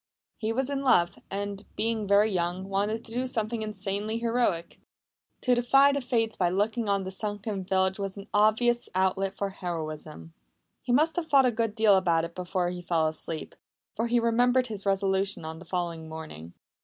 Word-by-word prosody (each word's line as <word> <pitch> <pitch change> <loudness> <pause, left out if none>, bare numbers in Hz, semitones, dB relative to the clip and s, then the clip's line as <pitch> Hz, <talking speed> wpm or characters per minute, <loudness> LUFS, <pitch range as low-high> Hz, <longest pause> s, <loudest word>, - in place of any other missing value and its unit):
He 220 0 -2
was 265 +4 -1
in 275 -1 -1
love, 175 -10 +3
and, 200 0 -4
being 225 -2 -1
very 205 +2 +4
young, 180 +1 -1
wanted 205 +3 -1
to 225 - -11
do 250 +2 -1
something 225 -2 -2
insanely 210 +1 -3
heroic. 230 -7 -1 0.6
To 250 - +3
defy 270 +4 +5
the 280 0 -1
Fates 230 -3 0
by 180 -2 +1
looking 210 +4 0
on 200 -1 +1
the 190 - -5
sunken 205 0 -3
village 190 +1 +1
was 195 0 -3
an 200 - -9
obvious 220 +3 +3
outlet 190 +1 0
for 200 -1 -2
heroism. 155 - -6 0.5
He - - -3
must 310 +7 +3
have 340 -2 -1
thought 275 -3 +5
a 250 - +3
good 225 -2 -1
deal 215 -3 +5
about 170 -3 +2
it 170 - -9
before 180 0 -2
he 180 0 -5
fell 170 -2 +1
asleep, 155 0 -3 0.4
for 230 +2 0
he 240 +1 +3
remembered 245 +2 +3
his 210 -4 -6
resolution 195 -2 +1
on 160 0 -6
the 175 - -12
following 170 -2 -3
morning. 120 - -9
200 Hz, 185 wpm, -28 LUFS, 180-230 Hz, 0.6 s, defy